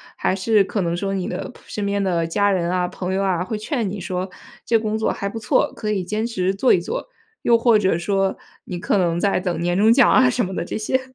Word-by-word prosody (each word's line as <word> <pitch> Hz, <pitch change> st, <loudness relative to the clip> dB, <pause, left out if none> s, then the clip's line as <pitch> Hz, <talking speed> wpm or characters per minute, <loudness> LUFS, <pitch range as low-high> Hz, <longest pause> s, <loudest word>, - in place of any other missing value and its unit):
还 185 Hz, -, 0 dB
是 205 Hz, +2 st, +3 dB
可 205 Hz, -, -2 dB
能 170 Hz, -1 st, -1 dB
说 195 Hz, +2 st, -2 dB
你 185 Hz, -2 st, -2 dB
的 -, -, -4 dB
扑 250 Hz, -, -15 dB
身 210 Hz, -, -5 dB
边 200 Hz, 0 st, 0 dB
的 170 Hz, -3 st, 0 dB
家 200 Hz, +4 st, +2 dB
人 175 Hz, -3 st, 0 dB
啊、 180 Hz, 0 st, 0 dB
朋 185 Hz, +1 st, -4 dB
友 195 Hz, -, 0 dB
啊， 180 Hz, -3 st, 0 dB
会 215 Hz, +4 st, -4 dB
劝 225 Hz, -1 st, -2 dB
你 200 Hz, +1 st, -5 dB
说 185 Hz, +1 st, -3 dB, 0.4 s
这 230 Hz, -, +3 dB
工 215 Hz, -1 st, -2 dB
作 220 Hz, -, +1 dB
还 200 Hz, -, -4 dB
不 225 Hz, +3 st, -5 dB
错， 220 Hz, -, +1 dB
可 215 Hz, -, -4 dB
以 200 Hz, -3 st, 0 dB
坚 215 Hz, +5 st, -2 dB
持 190 Hz, -5 st, -1 dB
做 220 Hz, +6 st, +2 dB
一 -, -, +5 dB
做？ 175 Hz, -, -5 dB, 0.3 s
又 235 Hz, -, +4 dB
或 230 Hz, -2 st, +4 dB
者 190 Hz, -4 st, +2 dB
说 195 Hz, +2 st, 0 dB, 0.3 s
你 180 Hz, -, -5 dB
可 205 Hz, +2 st, 0 dB
能 170 Hz, -2 st, +1 dB
在 195 Hz, -1 st, +1 dB
等 180 Hz, -1 st, -2 dB
年 175 Hz, +1 st, 0 dB
终 210 Hz, +4 st, +4 dB
奖 245 Hz, +1 st, +5 dB
啊， 255 Hz, -1 st, +5 dB
什 245 Hz, -2 st, 0 dB
么 190 Hz, -, -6 dB
的 -, -, -2 dB
这 175 Hz, -, -4 dB
些？ 240 Hz, +4 st, 0 dB
195 Hz, 280 characters per minute, -21 LUFS, 180-215 Hz, 0.4 s, 一